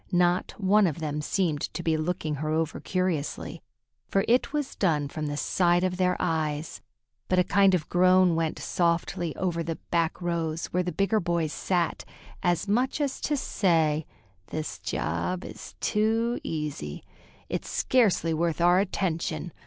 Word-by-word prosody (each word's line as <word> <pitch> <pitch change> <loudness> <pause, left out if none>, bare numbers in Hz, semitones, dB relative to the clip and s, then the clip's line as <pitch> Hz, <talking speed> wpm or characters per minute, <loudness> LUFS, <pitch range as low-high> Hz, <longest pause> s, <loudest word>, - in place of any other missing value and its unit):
Not 175 0 +2
one 200 0 +4
of 155 - -2
them 150 -2 -3
seemed 155 -2 0
to 175 - -3
be 160 -1 +2
looking 155 -1 -2
her 155 +2 -3
over 160 0 -1
curiously, 175 -3 -2 0.5
for 195 - +1
it 245 +4 +3
was 295 -2 -2
done 155 -7 +1
from 155 +1 -4
the 145 0 -3
side 175 +3 +2
of 180 -1 0
their 180 -1 +2
eyes; 155 -3 -2 0.5
but 185 - +1
a 180 - +5
kind 195 +1 +4
of 155 -4 -2
groan 185 0 +5
went 165 -1 -1
softly 170 -1 0
over 175 -3 -1
the 165 0 -3 0.2
back 165 -1 +1
rows, 170 -2 -2
where 180 - +2
the 180 0 -2
bigger 200 +3 +1
boys 170 -4 -1
sat, 175 -4 -1 0.4
as 175 +3 +1
much 245 +8 +1
as 285 -2 -1
to 295 - 0
say, 160 - +1 0.4
"This 155 0 -4
job 85 - -2
is - - -10
too 225 +3 +1
easy. 150 - -4 0.4
It's - - -4
scarcely 205 -10 +2
worth 165 +1 0
our 175 +2 +5
attention. 175 -4 -2
175 Hz, 160 wpm, -27 LUFS, 160-185 Hz, 0.5 s, a